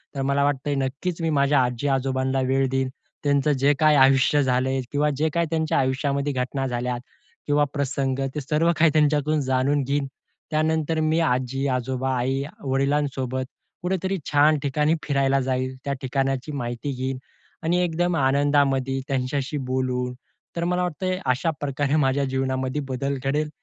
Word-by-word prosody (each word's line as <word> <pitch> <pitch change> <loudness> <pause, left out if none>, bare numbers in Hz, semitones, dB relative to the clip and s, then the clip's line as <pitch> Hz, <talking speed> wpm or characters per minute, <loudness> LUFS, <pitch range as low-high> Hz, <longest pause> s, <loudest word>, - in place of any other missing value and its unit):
तर 135 - -2
मला 140 +1 +1
वाटतंय 145 0 0
नक्कीच 140 +6 -2
मी 165 - 0
माझ्या 140 0 +4
आजी-आजोबांना 130 +1 0
वेळ 135 0 +2
देईन. 135 0 0 0.3
त्यांचं 145 0 +2
जे 140 +2 +4
काही 155 -1 +5
आयुष्य 135 +2 +5
झाले 130 +1 +1
किंवा 150 +1 +2
जे 155 +2 +1
काही 170 0 +2
त्यांच्या 160 -1 +1
आयुष्यामध्ये 140 +1 0
घटना 130 +1 -2
झाल्या 125 0 -2 0.5
किंवा 145 0 +3
प्रसंग 135 -2 -1 0.2
ते 150 - -2
सर्व 155 +4 +2
काही 160 -1 +5
त्यांच्यातून 150 0 +2
जाणून 135 +2 +2
घेईन. 140 +1 -1 0.4
त्यानंतर 160 0 +1
मी 155 +1 +2
आजी-आजोबा, 130 -2 0
आई-वडिलांसोबत 135 0 -1 0.4
कुठेतरी 190 +1 -1
छान 150 +1 +4
ठिकाणी 150 +3 +2
फिरायला 135 -2 +2
जाईल. 130 0 -1
त्या 140 - 0
ठिकाणाची 135 +1 -1
माहिती 120 0 -4
घेईन 130 +1 -3 0.5
आणि 175 +2 +2
एकदम 175 +1 0
आनंदामध्ये 135 -1 +2
त्यांच्याशी 135 +2 -1
बोलू. 130 -1 -1 0.4
तर 170 - -1
मला 180 +1 +1
वाटतंय 185 +2 -2
अशा 130 +5 +1
प्रकारे 145 +1 0
माझ्या 140 -1 +2
जीवनामध्ये 130 +1 -1
बदल 135 +2 -2
घडेल 150 +2 0
140 Hz, 140 wpm, -24 LUFS, 130-150 Hz, 0.5 s, काही